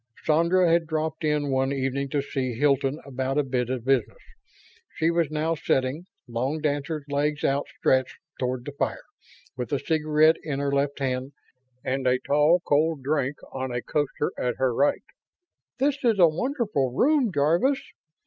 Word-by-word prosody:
Sandra 170 +4 +3
had 165 0 +2
dropped 160 0 -2
in 150 -2 0
one 135 0 +1
evening 135 0 -2
to 140 0 -1
see 130 -4 -3
Hilton 140 +2 +1
about 135 0 -2
a 150 - +3
bit 125 -2 -1
of 125 -2 -3
business. 130 -5 +1 0.8
She 165 +1 +2
was 170 -2 +1
now 155 +2 0
sitting, 145 +2 -1 0.2
long 130 +6 -2
dancer's 150 0 -2
legs 145 +1 -1
out 140 +1 +1
stretched 130 -1 +1 0.2
toward 125 -1 -2
the 145 - -5
fire, 140 - -3 0.5
with 125 +2 -5
a 140 - +2
cigarette 155 +1 +3
in 150 -3 -3
her 140 0 -1
left 140 0 0
hand 130 0 -2 0.5
and 130 0 -1
a 125 0 +4
tall, 150 +6 +3
cold 150 -1 +2
drink 140 -1 0 0.2
on 130 -1 -4
a 120 0 -3
coaster 145 0 -1
at 125 -1 -1
her 130 -2 +1
right. 140 +5 +1 0.7
"This 280 +1 +1
is 230 -4 +3
a 175 -3 +7
wonderful 200 - -1
room, 270 - +2
Jarvis. 175 - +2
145 Hz, 165 wpm, -25 LUFS, 130-160 Hz, 0.8 s, a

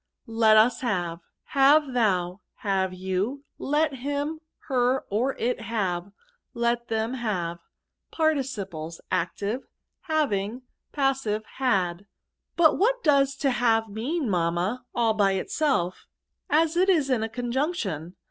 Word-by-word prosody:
Let 225 -1 +4
us 230 +2 +4
have* 175 -8 -1 0.3
Have 280 0 +4
thou. 185 -6 +1 0.3
Have 190 -2 +1
you. 190 +9 -2 0.2
Letliim, 290 +1 -1 0.3
her, 255 -1 +1
or 245 +7 +1
it 245 +1 -1
have. 200 -4 -2 0.4
Let 235 0 0
them 225 +2 -1
have. 185 -9 -2 0.5
Particiflxs. 205 - -2
Active. 200 +7 -2 0.2
— - - -57
Having. 245 -5 0 0.3
Patsive. 270 -7 0
— - - -20
Had. 195 -7 0 0.2
'' - - -57
But 320 -3 +5
what - - +2
does 275 -2 +3
to 275 -1 +1
have 230 -2 +2
mean^ 230 +10 -3
mammay 180 +1 0 0.2
all 230 -2 +3
by 200 -2 +2
itself^ 190 - 0 0.6
as 315 +2 +3
it 370 +2 +3
is 305 -7 +3
in 245 -4 +2
the 225 - -2
conjugation 235 - -2
235 Hz, 130 wpm, -26 LUFS, 195-275 Hz, 0.6 s, But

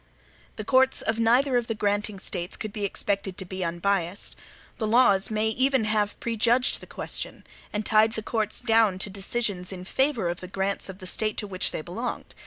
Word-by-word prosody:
The 215 - -5
courts 260 +3 +3
of 220 +1 0
neither 245 +3 +4
of 240 -1 -1
the 225 - -1
granting 205 0 0
States 175 -2 -5
could 215 -2 -5
be 210 -2 -2
expected 195 -1 -2
to 190 - -5
be 185 +1 -4
unbiased. 175 +2 0 0.4
The 220 - -1
laws 215 -4 +5
may 220 0 +1
have 220 - -7
even 265 -4 +3 0.3
prejudged 235 +2 +1
the - - -12
question, - - -4 0.3
and 210 0 -2
tied 220 0 +4
the 220 - -4
courts 215 -1 -1
down 225 -5 +4
to 195 +1 -1
decisions 195 -2 -2
in 185 -1 -6
favor 265 0 +1
of 175 0 -2
the 185 - -7
grants 195 +2 -2
of 190 - -7
the 185 - -10
State 215 +3 -2
to - - -2
which 185 -2 -1
they 155 - -5
belonged. 225 +10 -5
210 Hz, 195 wpm, -26 LUFS, 190-230 Hz, 0.4 s, laws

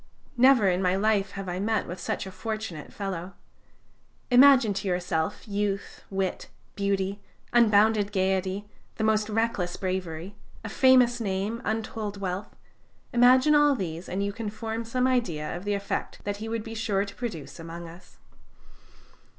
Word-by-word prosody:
Never 250 -4 +6
in 180 0 +2
my 180 0 +2
life 200 -1 +1
have 195 -1 -6
I 180 0 -3
met 220 +2 0
with 180 +1 -7
such 175 - -3
a 190 - -7
fortunate 215 -5 -5
fellow! 190 -2 -5 1.0
Imagine 250 -4 +7
to 195 - -4
yourself 175 0 -2
youth, 200 -1 -3
wit, 190 -1 -2 0.3
beauty, 200 0 -1 0.3
unbounded 215 -2 +4
gayety, 190 +1 0 0.3
the 220 - -3
most 215 0 +2
reckless 215 -5 -1
bravery, 185 -1 -4 0.3
a - - -4
famous 250 0 +5
name, 205 +3 -2
untold 220 -2 -3
wealth 190 +1 -4 0.6
imagine 255 +5 +6
all 295 -1 +5
these, 170 -5 -5
and 195 +2 -1
you 200 0 -2
can 225 -1 -4
form 225 +1 -4
some 250 +2 0
idea 195 -14 0
of 175 +3 -7
the 205 0 0
effect 200 0 -4
that 205 0 -3
he 220 +2 -6
would 225 -1 -2
be 225 0 -7
sure 215 -3 0
to 200 - -10
produce 170 - -6
among 165 +1 -8
us. 175 +2 -15
200 Hz, 155 wpm, -27 LUFS, 185-225 Hz, 1.0 s, Imagine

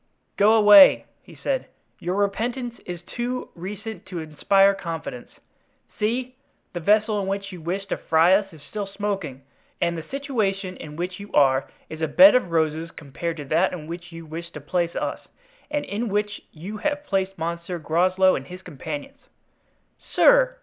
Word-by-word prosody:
"Go 210 +2 +5
away," 220 +6 +8 0.2
he - - -16
said; - - -2 0.3
"your 180 +2 -2
repentance 235 +5 -2
is 175 -1 -6
too 245 +6 -4
recent 200 +3 -7
to 185 -2 -6
inspire 195 +5 +3
confidence. 165 -9 -6 0.7
See! 245 +4 -1 0.4
the 175 - -3
vessel 210 +4 +2
in 190 - -4
which 195 +1 -3
you 180 -3 -9
wished 190 +4 -4
to - - -1
fry 165 +3 +4
us 195 0 +2
is 155 -4 -15
still 205 +6 -5
smoking; 195 -10 -4 0.4
and 170 0 0
the 165 - -4
situation 205 - -2
in 150 -3 -9
which 180 +3 -4
you 200 0 -10
are 135 -1 +3 0.2
is 160 0 -9
a 160 - +1
bed 280 - +8
of 250 -8 +2
roses 160 0 0
compared 165 +2 -6
to 145 - -6
that 165 +7 +2
in 165 -4 -6
which 170 +2 -8
you 165 0 -9
wished 170 +2 -8
to - - -5
place 170 +3 -1
us - - -2 0.5
and 295 -1 -2
in 220 +3 -3
which 205 0 -1
you 185 +7 -7
have 290 +5 -2
placed 195 -4 -1
Monsieur 170 +2 -4
Groslow 185 +4 +3
and 135 - -6
his 180 +1 -10
companions." 160 - -7 0.8
"Sir!" - - +4
185 Hz, 170 wpm, -24 LUFS, 165-210 Hz, 0.8 s, away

